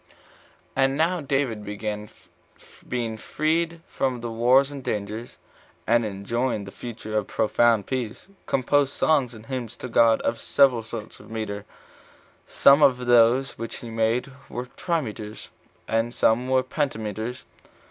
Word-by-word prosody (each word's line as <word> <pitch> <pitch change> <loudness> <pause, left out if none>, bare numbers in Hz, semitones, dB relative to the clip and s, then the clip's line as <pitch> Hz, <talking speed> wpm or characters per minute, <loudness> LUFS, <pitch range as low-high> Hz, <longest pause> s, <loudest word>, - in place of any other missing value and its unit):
3. - - -26 0.6
And 135 0 +3
now 170 +2 +1
David 135 -6 -1 1.3
being 115 -3 -2
freed 165 +5 -1
from 130 -2 -1
wars 120 +4 +3
and 140 -2 -7
dangers, 105 +2 -4 0.5
and 115 +1 +3
enjoying 110 +3 -2
for - - -8
the - - -24
future 115 -3 -7
a 105 - +2
profound 110 +1 +2
peace, 125 -5 -3
22 195 - -25
composed 140 +1 +2
songs 135 -7 +2
and 110 0 -12
hymns 125 -3 -5
to - - -6
God 115 -1 +4
of 115 - -1
several 130 -4 +4
sorts 110 -1 -8
of - - -15
metre; 105 -2 -4 0.8
some 140 +2 +5
of 125 -3 +4
those 120 +2 +4
which 115 0 -5
he 115 - -8
made 115 +4 0 0.2
were 125 +1 -4
trimeters, 110 - -4 0.4
and 115 +1 0
some 120 +3 +2
were 130 0 +3
pentameters. 125 -4 -3
120 Hz, 140 wpm, -25 LUFS, 110-135 Hz, 1.3 s, some